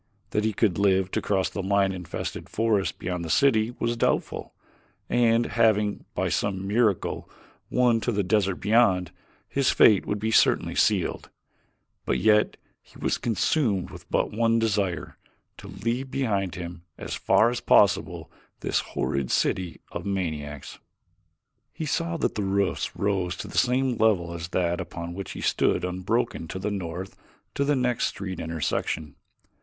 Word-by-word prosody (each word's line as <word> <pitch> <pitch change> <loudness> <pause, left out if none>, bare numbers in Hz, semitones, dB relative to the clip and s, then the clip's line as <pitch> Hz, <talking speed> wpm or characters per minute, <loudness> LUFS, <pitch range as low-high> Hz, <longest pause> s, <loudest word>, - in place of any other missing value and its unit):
That 105 - 0
he 110 - +1
could 100 -3 +1
live 95 -2 +2
to - - -1
cross 95 -2 +1
the 100 - -4
lion 100 0 +2
infested 90 -3 -6
forest 110 -3 0
beyond 90 -1 -3
the 80 - -5
city 120 - +3
was 120 0 -1
doubtful, - - -1 0.6
and 115 -1 +3
having, 110 -3 +1
by - - 0
some 95 -2 -1
miracle, 105 -2 0 0.4
won 120 -2 +3
to 120 - 0
the 100 -2 0
desert 100 0 +1
beyond, 95 -5 +2 0.4
his 135 -1 +1
fate 105 -3 +5
would 105 - -1
be 110 +2 -2
certainly - - +3
sealed; - - +1 0.7
but - - 0
yet 105 -1 +3 0.2
he - - -19
was - - -1
consumed 110 - 0
with - - -12
but - - 0
one 115 +1 +2
desire 100 -7 -1 0.4
to - - -11
leave 125 +3 -3
behind 100 -9 -1
him 85 -1 -7 0.2
as - - -6
far 115 +3 +3
as 120 - -3
possible 95 -5 +3 0.3
this - - +1
horrid 70 -2 -2
city 90 -3 0
of - - -5
maniacs. 80 -7 -4 0.9
He 160 - -5
saw 170 +2 -1
that - - 0
the 105 - -2
roofs 100 0 -1
rose 95 -3 -1
to 105 - -6
the - - -10
same 125 -1 +2
level 95 -6 +2
as 85 -1 -5
that 85 -1 0
upon 85 0 -6
which 95 +2 -6
he - - -7
stood - - +1
unbroken 95 +2 -1
to 95 - -6
the 100 +3 -2
north 95 -1 -5 0.4
to 140 - 0
the 145 +1 +2
next 125 -2 +1
street 95 -3 -5
intersection. 80 -2 -2
100 Hz, 160 wpm, -26 LUFS, 90-115 Hz, 0.9 s, fate